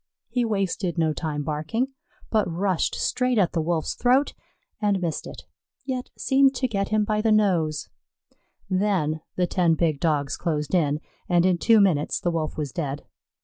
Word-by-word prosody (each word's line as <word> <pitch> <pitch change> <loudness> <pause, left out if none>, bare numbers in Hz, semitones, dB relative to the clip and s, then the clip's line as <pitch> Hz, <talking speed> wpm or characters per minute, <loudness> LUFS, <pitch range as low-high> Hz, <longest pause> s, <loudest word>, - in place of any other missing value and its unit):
He 245 - 0
wasted 195 -5 -1
no 160 -2 +2
time 150 -2 -3
barking, 155 - -2 0.4
but 215 -4 +2
rushed 185 0 0
straight 250 -1 0
at 185 -5 +3
the 165 - 0
Wolf's 160 0 -1
throat 255 +4 +2 0.5
and 205 -2 +2
missed 170 -4 -3
it, - - -9 0.4
yet 255 -2 -3
seemed 270 0 +3
to 255 0 0
get 200 -4 -2
him 215 0 +2
by 210 0 0
the 220 0 +2
nose; 175 -8 +2 0.8
then 185 -6 0
the 180 - +2
ten 175 -2 +2
big 155 -3 0
Dogs 145 -3 0
closed 150 -3 -2
in, 150 -4 +2 0.3
and 175 0 +4
in 180 -2 +2
two 225 +3 +5
minutes 170 -7 +2
the 175 - 0
Wolf 160 -2 -3
was 150 -3 -3
dead. 145 -5 -4
180 Hz, 170 wpm, -25 LUFS, 155-215 Hz, 0.8 s, two